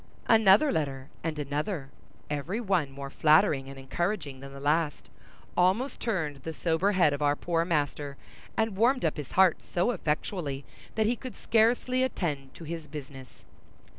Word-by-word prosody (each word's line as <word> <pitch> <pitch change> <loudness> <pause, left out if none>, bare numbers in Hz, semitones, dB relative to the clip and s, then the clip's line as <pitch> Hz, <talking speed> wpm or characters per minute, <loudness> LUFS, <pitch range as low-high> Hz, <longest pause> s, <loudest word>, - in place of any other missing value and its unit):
Another 220 +5 +6
letter 140 -4 -2
and 160 -2 -2
another, 145 +1 -3 0.4
every 150 +9 -2
one 190 - +1
more 140 0 -8
flattering 150 -3 +4
and 135 - -9
encouraging 140 +1 -3
than 135 +1 -9
the 140 - -9
last, 150 +2 0 0.4
almost 190 +10 +2
turned 160 -11 -1
the 160 +4 -6
sober 170 +5 +1
head 175 -6 +4
of 145 - -4
our 145 0 +3
poor 165 +1 0
master, 145 -3 -1 0.4
and 220 -2 +1
warmed 240 +2 +3
up 160 - 0
his 150 -3 -7
heart 185 -3 +4
so 180 +7 0
effectually 150 - -2 0.3
that 220 - +2
he 235 +3 +2
could 255 +1 -8
scarcely 240 +3 +2
attend 150 - -2
to - - -10
his 165 0 -6
business. 135 -4 -10
160 Hz, 160 wpm, -28 LUFS, 140-195 Hz, 0.4 s, Another